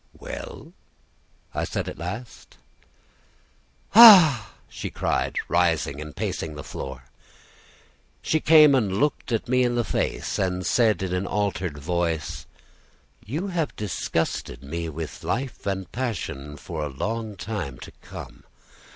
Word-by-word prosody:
"Well?" - - -8 0.8
I - - -1
said - - -3
at - - -7
last. 100 +8 -7 1.4
"Ah!" 175 - +9
she - - -6
cried, - - -1
rising 70 +1 +1
and 75 -1 -9
pacing 80 -2 -3
the 75 - -7
floor. 65 -1 -7 1.2
She 155 - +1
came 155 -2 +7
and 105 -8 +1
looked 145 -1 0 0.2
me 125 +1 +3
in 120 -1 +1
the 120 - +1
face, - - -2
and 90 -1 -1
said 110 -6 +2
in 90 -1 -2
an 90 +1 -1
altered 95 -6 -2
voice: 80 -1 -2 0.8
"You 160 - -3
have 165 -5 -2
disgusted 85 - -3
me 85 +4 -4
with 80 0 -7
life 130 -3 -3
and 95 -3 -3
passion 85 - -4
for 80 +1 -5
a 75 - -3
long 110 +9 -4
time 95 - -5
to - - -9
come. - - -10
95 Hz, 130 wpm, -25 LUFS, 80-125 Hz, 1.4 s, Ah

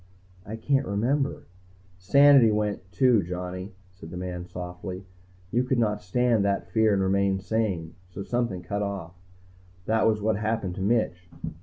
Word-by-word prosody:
"I 110 - -5
can't 135 +3 0
remember 130 +8 0 0.3
" 95 0 -29 0.2
"Sanity 135 +5 +6
went, 105 -3 -2
too, 125 -2 +4
Johnny," 90 +2 -5 0.2
said 90 -3 -12
the 90 - -7
man 90 -1 -5
softly. 90 +1 -7 0.5
"You 120 +2 +2
could 125 0 0
not 105 -3 +1
stand 115 +3 +1
that 100 0 0
fear 110 -1 +3
and 95 -1 +2
remain 100 0 +2
sane, 95 -6 -2 0.2
so 95 +2 -7
something 120 -7 -2
cut 100 +4 -3
off. 100 -4 -4 0.7
That 110 0 +2
was 110 -1 +2
what 110 0 0
happened 110 -3 -2
to 95 - -6
Mitch." 95 -4 0
100 Hz, 160 wpm, -26 LUFS, 90-110 Hz, 0.7 s, Sanity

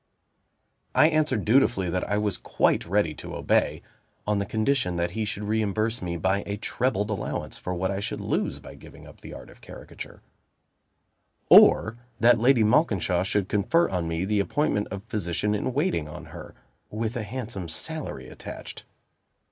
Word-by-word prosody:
I 155 - +6
answered 155 -9 +1
dutifully 105 -6 +3
that 90 +1 -2
I 105 - +1
was 105 -2 0
quite - - 0
ready 90 -4 +1
to - - -8
obey, - - +1 0.4
on 105 -1 +1
the 100 - -2
condition 110 -4 0
that 85 0 -1
he 110 +3 -2
should 105 0 -4
reimburse 110 +2 -1
me 85 -1 -3
by 95 +4 +1
a 100 0 -3
trebled 110 -2 -1
allowance 100 - -4
for 90 - -4
what 95 +2 -1
I 100 - -2
should 100 - -4
lose - - -1
by - - -12
giving - - -14
up - - -15
the - - -9
Art - - -11
of - - -19
Caricature, - - -11 1.3
or 115 +2 +7 0.2
that 120 0 +5
Lady 120 -1 +4
Malkinshaw 105 - +2
should 95 0 0
confer 135 - +2
on 90 -3 -2
me 80 +2 -2
the 105 +1 +1
appointment 105 -1 0
of 100 0 -6
physician 105 -1 -2
in 105 +4 -1
waiting 145 - 0
on 75 - -9
her, - - -10 0.3
with 110 +2 -3
a 120 - -2
handsome 105 -5 -6
salary 160 - -4
attached. - - -9
105 Hz, 170 wpm, -26 LUFS, 95-115 Hz, 1.3 s, or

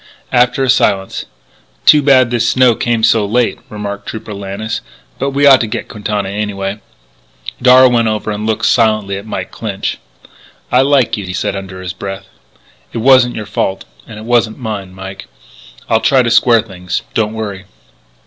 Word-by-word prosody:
After 125 +2 +2
a 130 - 0
silence: 95 -7 0 0.6
"Too 150 - +7
bad 130 -3 +4
this 120 -1 +1
snow 130 -2 +4
came 115 0 -1
so 110 -1 +4
late," 115 +3 0
remarked 100 -1 -6
Trooper 110 -1 -6
Lannis. 100 +3 -5 0.4
"But 135 - 0
we 140 +1 +1
ought 135 -2 +7
to 115 - -1
get 110 - -5
Quintana 105 -1 -3
anyway." 100 0 -3 0.8
Darragh 130 0 +6
went 115 -1 +2
over 110 0 -2
and 105 +1 -4
looked 110 - 0
silently 110 -4 +2
at 100 +2 -8
Mike - - -5
Clinch. 100 -4 -4 0.7
"I 125 - +5
liked 135 -4 +2
you," 100 - -5
he 90 - -5
said - - -2
under 95 -1 -7
his 90 0 -5
breath. 95 -1 -7 0.7
"It - - -6
wasn't 125 +1 +4
your 110 - -5
fault. 95 -1 -2 0.2
And 105 - -10
it 110 - -9
wasn't 120 -2 +1
mine, 105 -6 -6
Mike.... 95 +1 -9 0.6
I'll 110 0 +2
try 135 -2 +3
to 120 - 0
square 115 -1 +4
things. 90 -4 -5
Don't 110 -1 0
worry." 100 -3 -5
110 Hz, 175 wpm, -14 LUFS, 100-120 Hz, 0.8 s, Too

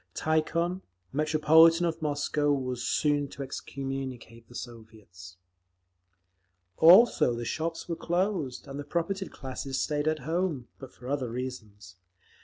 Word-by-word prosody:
Tikhon, 170 +3 0 0.3
Metropolitan 160 +3 +5
of 165 -1 -2
Moscow, 145 0 0
was 130 -3 -2
soon 145 -1 +1
to 140 - -7
excommunicate 130 -4 -6
the 120 - -14
Soviets…. 110 -7 -11 1.4
Also 175 - +6
the 120 0 -5
shops 165 +5 -3
were 170 - -2
closed, 175 -7 -2
and 140 +1 -7
the - - -4
propertied 170 +5 -2
classes 135 0 -5
stayed 150 0 -1
at 155 0 +2
home—but 155 -6 -3
for 125 - -13
other 135 -3 -2
reasons. 110 -7 -7
145 Hz, 120 wpm, -28 LUFS, 125-160 Hz, 1.4 s, Also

